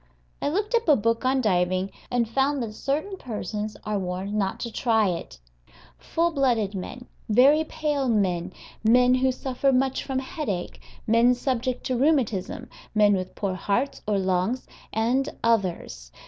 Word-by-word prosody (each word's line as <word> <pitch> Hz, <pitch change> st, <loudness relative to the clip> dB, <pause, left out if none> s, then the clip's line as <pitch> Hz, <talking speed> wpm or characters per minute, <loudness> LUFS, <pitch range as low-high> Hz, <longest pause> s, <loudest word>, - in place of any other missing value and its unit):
I -, -, 0 dB
looked 410 Hz, +8 st, -1 dB
up 470 Hz, -3 st, +2 dB
a 295 Hz, -, +8 dB
book 230 Hz, +1 st, 0 dB
on 260 Hz, +1 st, +2 dB
diving, 185 Hz, -2 st, +1 dB, 0.2 s
and 240 Hz, -2 st, +1 dB
found 270 Hz, +3 st, +1 dB
that 215 Hz, -2 st, -5 dB
certain 310 Hz, -, -2 dB
persons 215 Hz, -, -5 dB
are 210 Hz, -1 st, -1 dB
warned 185 Hz, +2 st, -4 dB
not 200 Hz, -2 st, -1 dB
to 235 Hz, -, -4 dB
try 220 Hz, -4 st, +2 dB
it 170 Hz, -, -5 dB, 0.6 s
full 340 Hz, +1 st, 0 dB
blooded 240 Hz, -9 st, +1 dB
men, 245 Hz, +6 st, -6 dB, 0.2 s
very 275 Hz, +8 st, +5 dB
pale 295 Hz, -4 st, -1 dB
men, 185 Hz, -5 st, +1 dB, 0.3 s
men 250 Hz, +3 st, +5 dB
who 260 Hz, +1 st, +3 dB
suffer 260 Hz, +1 st, 0 dB
much 265 Hz, 0 st, +1 dB
from 265 Hz, -2 st, -3 dB
headache, 260 Hz, -, -4 dB, 0.2 s
men 230 Hz, +3 st, +4 dB
subject 250 Hz, 0 st, -2 dB
to 255 Hz, -, 0 dB
rheumatism, 250 Hz, -6 st, 0 dB, 0.3 s
men 210 Hz, -1 st, +5 dB
with 185 Hz, -1 st, -3 dB
poor 195 Hz, -2 st, -2 dB
hearts 205 Hz, +9 st, -1 dB
or 210 Hz, -1 st, +2 dB
lungs, 190 Hz, +6 st, 0 dB, 0.3 s
and 245 Hz, +5 st, +1 dB
others. 180 Hz, -, -1 dB
230 Hz, 155 wpm, -25 LUFS, 200-265 Hz, 0.6 s, a